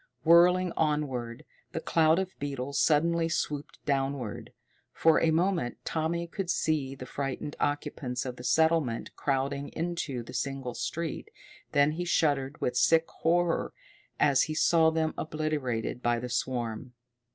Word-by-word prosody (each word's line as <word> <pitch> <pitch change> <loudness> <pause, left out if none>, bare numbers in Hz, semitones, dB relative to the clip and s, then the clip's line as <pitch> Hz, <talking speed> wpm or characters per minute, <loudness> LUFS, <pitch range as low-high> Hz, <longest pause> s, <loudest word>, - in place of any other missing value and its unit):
Whirling 180 +2 +5
onward, 135 -7 -1 0.3
the - - -2
cloud 160 0 +3
of 190 0 -2
beetles 140 -1 -3
suddenly 165 +2 +3
swooped 150 -3 -3
downward. 135 -4 -2 0.4
For 160 -1 +4
a 165 - +3
moment 165 -5 +1
Tommy 165 +2 -1
could 180 +1 -5
see 150 -6 0
the 130 - -8
frightened 140 +2 -4
occupants 135 -3 -2
of 125 -1 -5
the 125 - -9
settlement 160 -5 +1
crowding 140 +1 -1
into 165 -7 -3
the - - -11
single 135 -3 -3
street, 165 +3 -4 0.4
then 145 +1 +4
he 175 +3 -3
shuddered 145 -4 +1
with 125 - -1
sick 160 +5 +4
horror 170 +1 +1 0.4
as 140 -3 +4
he 155 - -2
saw 160 0 +4
them 160 -1 0
obliterated 150 -7 -2
by 120 -1 +1
the 125 +1 -5
swarm. 120 -1 -3
150 Hz, 140 wpm, -29 LUFS, 130-165 Hz, 0.4 s, Whirling